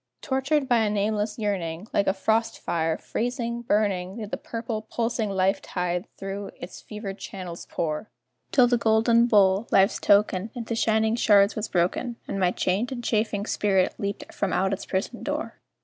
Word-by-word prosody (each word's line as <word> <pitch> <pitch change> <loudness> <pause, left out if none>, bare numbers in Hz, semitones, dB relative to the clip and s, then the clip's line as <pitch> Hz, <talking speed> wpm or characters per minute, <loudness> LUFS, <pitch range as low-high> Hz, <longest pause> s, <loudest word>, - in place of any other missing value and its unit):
Tortured 270 +1 +1
by 240 -2 +4
a 220 -1 +2
nameless 210 +1 -1
yearning, 190 -4 -2
Like 200 - +2
a 190 - +4
frost 220 +3 +1
fire, 160 -1 -1
freezing, 235 0 -3
burning, 200 -5 0
Did 215 -2 -6
the - - -2
purple, 230 -1 -4
pulsing 230 0 -2
life 195 0 +1
tide 180 0 -2
through 195 +1 -5
its 175 - -9
fevered 210 -2 -7
channels 180 -3 -7
pour, 160 +6 -3 0.4
Till 255 - +6
the 245 -1 +2
golden 230 +1 +4
bowl 200 -1 +4
Life's 195 +3 +4
token 205 0 +3
Into 230 -1 -4
shining 220 0 +2
shards 205 -3 +4
was 215 0 -2
broken, 185 +7 0
And 195 - -3
my 185 -2 +3
chained 195 +7 0
and 240 -2 -5
chafing 215 -3 0
spirit 195 -4 +1
leaped 200 0 -4
from 200 - -1
out 190 +1 +1
its 195 - -5
prison 200 +5 -2
door. 295 +2 -4
210 Hz, 170 wpm, -26 LUFS, 190-230 Hz, 0.4 s, Till